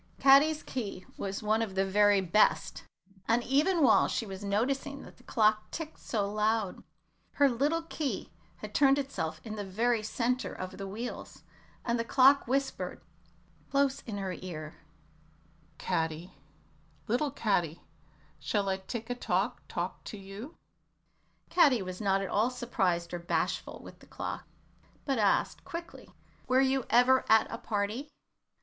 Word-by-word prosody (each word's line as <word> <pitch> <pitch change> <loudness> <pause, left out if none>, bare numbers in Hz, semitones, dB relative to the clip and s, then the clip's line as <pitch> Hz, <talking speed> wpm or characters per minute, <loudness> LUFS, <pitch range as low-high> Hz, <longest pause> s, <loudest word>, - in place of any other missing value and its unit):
Caddy's 290 +3 +6
key 205 -7 -5
was 195 +2 -4
one 215 +1 +2
of 205 -4 -3
the 195 0 +2
very 205 0 +4
best, 190 +4 +2 0.4
and 235 +1 +2
even 305 +7 +2
while 235 -5 +5
she 230 - -2
was 195 -1 -8
noticing 270 +8 -1
that - - -14
the 250 - -20
clock 215 -2 +2
ticked 320 -1 -6
so 205 -4 -1
loud, 215 -1 0 0.5
her 285 - +5
little 285 +7 +1
key 310 -3 -4 0.2
had - - -9
turned 275 -1 +5
itself 160 - -3
in 215 -1 -6
the 205 - -3
very 225 +4 +1
centre 240 +4 -1
of 185 +1 -7
the 195 - -4
wheels, 225 +5 -7 0.4
and 235 0 0
the - - +1
clock 270 +3 +5
whispered, 270 +2 -1 0.7
close 275 -1 +2
in 210 -3 -4
her 195 -2 -3
ear, 155 -3 -7 1.0
"Caddy, 160 +2 -2 0.7
little 250 +7 +1
Caddy, 180 - 0 0.6
shall 200 -2 -1
I 190 - 0
tick 225 +4 -6
a - - +2
tock 245 - -1
talk - - -4
to 215 - -7
you?" 200 - -9 0.9
Caddy 270 - +5
was 185 +1 -6
not 195 -1 +2
at - - -3
all 220 +4 +2
surprised 190 -9 -1
or 175 - -2
bashful 170 +2 -2
with - - -12
the - - -18
clock, - - -6 0.6
but 270 -5 0
asked, 200 -2 +1
quickly, 340 0 -8 0.4
"Were 255 +1 +4
you 265 -1 +2
ever 250 +2 +5
at 220 0 +6
a 230 - -5
party?" 215 +7 -2
225 Hz, 150 wpm, -30 LUFS, 195-265 Hz, 1.0 s, Caddy's